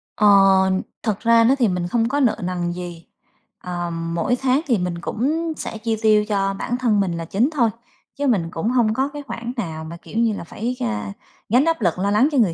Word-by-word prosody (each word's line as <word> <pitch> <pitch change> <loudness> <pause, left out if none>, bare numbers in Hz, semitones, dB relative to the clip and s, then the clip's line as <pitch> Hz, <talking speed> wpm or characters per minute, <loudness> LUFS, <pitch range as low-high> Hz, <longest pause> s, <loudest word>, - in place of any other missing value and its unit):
Ờ, 210 - +3 0.8
thật 215 -4 -1
ra 230 0 +4
nó 255 +4 +4
thì 250 -5 +2
mình 180 -2 -1
không 230 +4 +1
có 285 - 0
nợ 250 -6 +3
nần 175 -1 -2
gì, 175 -1 -8 0.5
ờ, 175 -1 -4
mỗi 165 +6 -1
tháng 265 +2 +2
thì 240 - +3
mình 180 -2 -3
cũng 315 - -1
sẽ - - -5
chi 225 0 -1
tiêu 215 -1 +4
cho 195 -2 0
bản 240 +5 -3
thân 235 -5 +2
mình 195 -3 +1
là 165 - -4
chính 210 - +1
thôi, 235 -6 +3 0.5
chứ 285 0 -1
mình 190 -10 +1
cũng 165 +7 -2
hông 235 -3 +2
có 265 +4 0
cái 290 -1 -6
khoản 235 -1 -5
nào 160 -7 -4
mà, 165 +2 -8
kiểu 215 - -9
như 230 -2 +2
là, - - -6
phải, 230 +8 -4
a, 105 -2 -3 0.4
gánh 250 +8 +4
áp 330 -6 0
lực 175 -2 +1
lo 200 +2 +1
lắng 215 +7 +4
cho 285 - 0
người 205 -8 +3
215 Hz, 230 wpm, -21 LUFS, 175-245 Hz, 0.8 s, ra